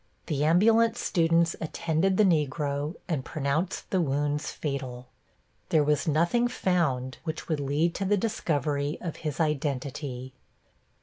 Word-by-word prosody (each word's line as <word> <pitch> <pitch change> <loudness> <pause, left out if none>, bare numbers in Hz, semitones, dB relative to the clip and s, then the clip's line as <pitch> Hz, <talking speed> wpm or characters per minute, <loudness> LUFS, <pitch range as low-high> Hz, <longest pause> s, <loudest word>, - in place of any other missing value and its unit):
The 145 -2 -1
ambulance 225 +8 +4
students 165 -2 +2
attended 165 +3 0
the 215 - +6
Negro 150 -3 0
and 150 -7 -1
pronounced 155 +6 -2
the 185 - +2
wounds 145 0 0
fatal. 130 -4 -5 0.6
There 155 -2 +4
was 150 +1 +1
nothing 170 +11 +2
found 160 - 0
which 160 -2 -5
would 155 -3 0
lead 145 +5 +1
to 195 - -3
the 205 +2 +3
discovery 150 -8 -1
of 165 -3 -5
his 150 -4 -4
identity. 140 -3 -2
155 Hz, 130 wpm, -27 LUFS, 140-170 Hz, 0.6 s, the